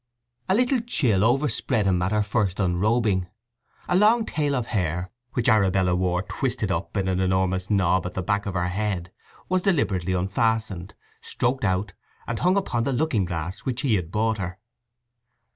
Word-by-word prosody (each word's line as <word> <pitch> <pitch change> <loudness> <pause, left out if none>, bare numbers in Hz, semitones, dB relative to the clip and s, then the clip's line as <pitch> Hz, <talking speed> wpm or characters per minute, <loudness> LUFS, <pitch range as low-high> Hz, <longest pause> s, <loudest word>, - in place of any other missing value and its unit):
A 190 - +4
little 250 +3 +2
chill 130 - +1
overspread 120 -2 +1
him 90 -2 +2
at 90 +2 0
her 105 0 +2
first 105 -3 -1
unrobing. 100 +1 +1 0.6
A 180 - +1
long 220 +4 +4
tail 145 -6 -1
of 125 -3 -1
hair, 90 -2 -1 0.2
which 120 - 0
Arabella 95 -5 +3
wore 90 0 0
twisted 110 -4 -2
up 85 +4 -3
in 95 -1 0
an 95 -1 0
enormous 95 0 0
knob 95 -3 +2
at 90 - -8
the 95 - -2
back 100 +2 -1
of 95 - -4
her 90 -1 0
head, 95 -2 -2 0.4
was 185 0 +1
deliberately 100 - +1
unfastened, 100 0 -1 0.3
stroked 125 +2 -1
out, 95 0 0 0.3
and 120 - -3
hung 185 +2 +3
upon 120 -12 0
the 135 - -1
looking 120 - +1
glass 85 +1 -4
which 125 -2 -3
he 135 -6 +1
had 90 -5 0
bought 110 +1 0
her. 90 -1 -4
100 Hz, 175 wpm, -24 LUFS, 95-120 Hz, 0.6 s, A